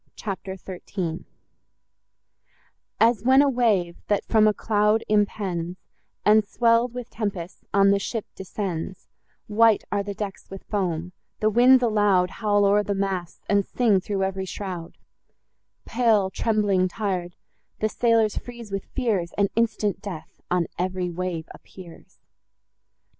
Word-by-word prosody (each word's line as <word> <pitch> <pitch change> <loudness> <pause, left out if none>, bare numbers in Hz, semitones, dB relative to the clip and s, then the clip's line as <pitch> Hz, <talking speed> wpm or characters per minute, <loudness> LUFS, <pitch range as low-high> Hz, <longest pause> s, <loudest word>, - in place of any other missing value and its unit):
CHAPTER 195 -2 -5
XIII 180 -2 -5 1.7
As 230 -1 +4
when 260 +4 +5
a - - +3
wave, 205 -9 +1
that 205 - 0
from 215 -1 +4
a - - +5
cloud 210 +1 +1
impends, 190 -4 0 0.5
And, 215 +1 +6
swell'd 230 +3 +2
with 250 -1 -7
tempests, 195 -5 -5
on 200 0 +5
the 200 - +3
ship 220 +2 -4
descends, 190 -2 -5 0.4
White 220 0 +4
are 205 - +1
the 200 0 -5
decks 200 -2 -6
with 195 0 -9
foam; 180 -4 -2 0.3
the 215 0 +2
winds 250 +3 +6
aloud, 205 -5 +3
Howl 205 -2 +1
o'er 205 +1 +4
the 205 -1 -2
masts, 190 -3 -3
and 200 -1 +3
sing 220 -2 +2
through 195 +1 -2
ev'ry 190 0 -2
shroud: 185 -3 -6 0.9
Pale, 220 -5 +2
trembling, 205 -4 +1
tir'd, 180 -3 -3 0.4
the 215 - 0
sailors 225 -1 +2
freeze 235 -3 -10
with 195 -1 -3
fears, 210 -10 0
And 200 -1 +2
instant 215 -4 0
death 180 -6 -8
on 175 -1 +1
ev'ry 180 0 -1
wave 175 -2 -4
appears. 175 -3 -14
200 Hz, 135 wpm, -24 LUFS, 185-220 Hz, 1.7 s, And